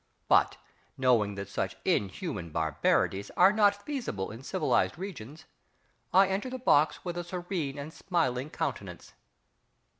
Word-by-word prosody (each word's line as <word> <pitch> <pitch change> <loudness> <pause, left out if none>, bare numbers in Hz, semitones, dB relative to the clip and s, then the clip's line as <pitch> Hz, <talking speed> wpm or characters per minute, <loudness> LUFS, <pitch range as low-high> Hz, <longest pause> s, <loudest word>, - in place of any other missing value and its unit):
But, - - +4 0.4
knowing 115 -6 +2
that 100 0 -5
such 100 - -3
inhuman 100 - -1
barbarities 80 +5 0
are 190 +3 +7
not 205 -1 +3
feasible 245 - -3
in 115 +3 -9
civilised 185 +4 0
regions, 160 - -8 0.7
I 190 +1 +6
enter 195 +6 -2
the 260 - -5
box 155 - +2
with 175 -1 -4
a - - -3
serene 175 -5 -4
and 145 +3 -7
smiling 150 -8 -1
countenance.... - - -5
155 Hz, 130 wpm, -29 LUFS, -, 0.7 s, are